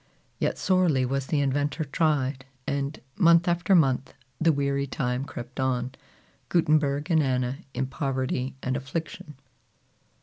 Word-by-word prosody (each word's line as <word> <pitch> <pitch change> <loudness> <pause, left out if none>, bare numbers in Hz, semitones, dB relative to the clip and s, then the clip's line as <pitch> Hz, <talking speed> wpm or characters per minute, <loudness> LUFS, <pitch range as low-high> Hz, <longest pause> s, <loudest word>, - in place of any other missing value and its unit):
Yet - - 0
sorely 175 -9 +2
was 135 +1 -2
the 150 -3 +1
inventor 145 +3 0
tried; 140 -3 0 0.2
and 140 +1 -2 0.2
month 170 -1 +5
after 175 +3 +3
month, 135 -5 +2 0.2
the 165 0 +4
weary 140 -1 0
time 125 -1 -2
crept 125 -2 -8
on, 130 -1 0 0.6
Gutenberg 150 -2 +2
and 160 -1 +5
Anna 130 -1 0 0.2
in 135 - 0
poverty 130 -2 -2
and 130 0 0
affliction. 155 +4 -5
140 Hz, 130 wpm, -26 LUFS, 130-160 Hz, 0.6 s, month